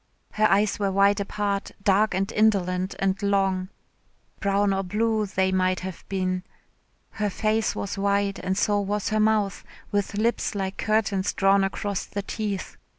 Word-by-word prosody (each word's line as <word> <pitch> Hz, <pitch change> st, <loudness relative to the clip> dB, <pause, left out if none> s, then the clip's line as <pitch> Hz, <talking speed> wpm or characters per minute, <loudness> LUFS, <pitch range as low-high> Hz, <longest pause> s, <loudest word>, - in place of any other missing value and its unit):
Her 215 Hz, 0 st, +3 dB
eyes 205 Hz, +1 st, +2 dB
were 200 Hz, -1 st, +1 dB
wide 200 Hz, +1 st, +4 dB
apart, 200 Hz, 0 st, -2 dB
dark 200 Hz, 0 st, +3 dB
and 195 Hz, +2 st, -1 dB
indolent 190 Hz, -4 st, +1 dB
and 195 Hz, +1 st, 0 dB
long 195 Hz, -2 st, +1 dB, 0.7 s
brown 200 Hz, 0 st, +2 dB
or 195 Hz, -, 0 dB
blue 215 Hz, +3 st, 0 dB
they 190 Hz, -1 st, +1 dB
might 185 Hz, -1 st, +1 dB
have 185 Hz, -2 st, -7 dB
been. 185 Hz, -1 st, -1 dB, 0.7 s
Her 210 Hz, -1 st, -1 dB
face 215 Hz, +3 st, 0 dB
was 200 Hz, 0 st, -4 dB
wide 200 Hz, 0 st, +1 dB
and 190 Hz, +1 st, -2 dB
so 205 Hz, 0 st, +2 dB
was 205 Hz, +1 st, -1 dB
her 215 Hz, 0 st, +1 dB
mouth 215 Hz, -2 st, +1 dB, 0.3 s
with 205 Hz, 0 st, -1 dB
lips 225 Hz, 0 st, 0 dB
like 195 Hz, -1 st, -3 dB
curtains 210 Hz, -3 st, 0 dB
drawn 195 Hz, 0 st, +3 dB
across 195 Hz, 0 st, -2 dB
the 200 Hz, -, -4 dB
teeth. 205 Hz, -2 st, -4 dB
200 Hz, 155 wpm, -25 LUFS, 190-210 Hz, 0.7 s, wide